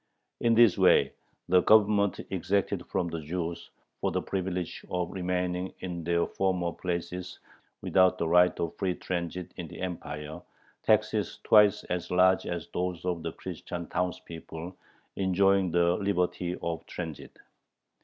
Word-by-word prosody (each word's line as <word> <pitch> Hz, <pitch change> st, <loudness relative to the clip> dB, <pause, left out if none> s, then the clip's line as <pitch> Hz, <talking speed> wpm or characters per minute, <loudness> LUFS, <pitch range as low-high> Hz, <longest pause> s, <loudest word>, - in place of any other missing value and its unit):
In 115 Hz, -1 st, +3 dB
this 115 Hz, -4 st, +6 dB
way -, -, +5 dB, 0.4 s
the 90 Hz, 0 st, +5 dB
Government 100 Hz, -1 st, +4 dB
exacted 95 Hz, 0 st, -1 dB
from 85 Hz, -2 st, -1 dB
the 85 Hz, -1 st, -4 dB
Jews, 85 Hz, +2 st, -4 dB, 0.3 s
for -, -, 0 dB
the -, -, -1 dB
privilege 90 Hz, -2 st, -3 dB
of 90 Hz, -2 st, -2 dB
remaining 90 Hz, 0 st, -2 dB
in 90 Hz, -2 st, -5 dB
their 85 Hz, +1 st, +1 dB
former 90 Hz, -3 st, -1 dB
places 90 Hz, +1 st, -4 dB, 0.5 s
without 95 Hz, -1 st, +4 dB
the 85 Hz, -, -1 dB
right 90 Hz, +2 st, +4 dB
of 85 Hz, -, -2 dB
free 95 Hz, -3 st, 0 dB
transit 90 Hz, 0 st, -4 dB
in -, -, -5 dB
the -, -, -11 dB
Empire, 80 Hz, -4 st, -5 dB, 0.4 s
taxes 110 Hz, -1 st, +1 dB
twice 105 Hz, -1 st, +5 dB
as 90 Hz, -1 st, -3 dB
large 95 Hz, +1 st, +4 dB
as 85 Hz, -2 st, -4 dB
those 90 Hz, -1 st, -2 dB
of 90 Hz, -2 st, -1 dB
the -, -, -4 dB
Christian 85 Hz, -1 st, -6 dB
townspeople 90 Hz, -1 st, -5 dB, 0.4 s
enjoying 95 Hz, 0 st, +3 dB
the 85 Hz, +1 st, +3 dB
liberty 90 Hz, -3 st, -1 dB
of 85 Hz, -1 st, -3 dB
transit. 80 Hz, -5 st, -7 dB
90 Hz, 140 wpm, -28 LUFS, 85-95 Hz, 0.5 s, this